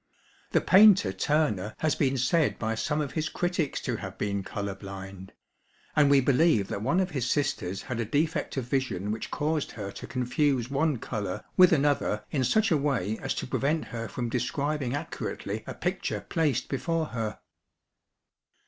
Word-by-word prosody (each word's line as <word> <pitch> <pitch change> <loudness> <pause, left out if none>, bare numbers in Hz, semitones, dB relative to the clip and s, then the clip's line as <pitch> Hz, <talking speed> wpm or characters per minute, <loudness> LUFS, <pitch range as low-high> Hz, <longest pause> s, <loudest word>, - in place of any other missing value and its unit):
The - - +2
painter 195 - +6
Turner 110 -4 0
has 155 -1 +1
been 135 -1 +1
said 150 +6 +2
by 110 0 -1
some 150 +7 -1
of 140 -3 -3
his 155 -1 -2
critics 175 -4 -1
to 120 -3 -2
have 95 -2 -7
been 100 -1 -1
colour 100 +1 -4
blind; 95 -1 -9 0.6
and 150 -2 +5
we 140 -1 +6
believe 135 - +3
that 100 - -3
one 170 - +2
of 185 -1 0
his 130 -5 -1
sisters 100 -10 -1
had 120 -2 -4
a 115 - 0
defect 150 +6 -1
of 130 - -1
vision 115 -7 -1
which 110 +1 -4
caused 150 0 -1
her 100 -2 -5
to - - -9
confuse 125 0 0
one 145 0 +1
colour 105 -4 -4
with 180 -1 +7
another 140 -8 +1
in 135 -3 +1
such 215 - +2
a 160 - +5
way 120 -8 -1
as - - -2
to - - -3
prevent 145 +5 0
her 115 -1 -3
from 120 +1 -3
describing 135 +3 -1
accurately 145 - -4
a - - -5
picture - - -2
placed 145 -7 0
before 165 +4 -1
her. 110 -3 -3
130 Hz, 175 wpm, -28 LUFS, 110-150 Hz, 0.6 s, with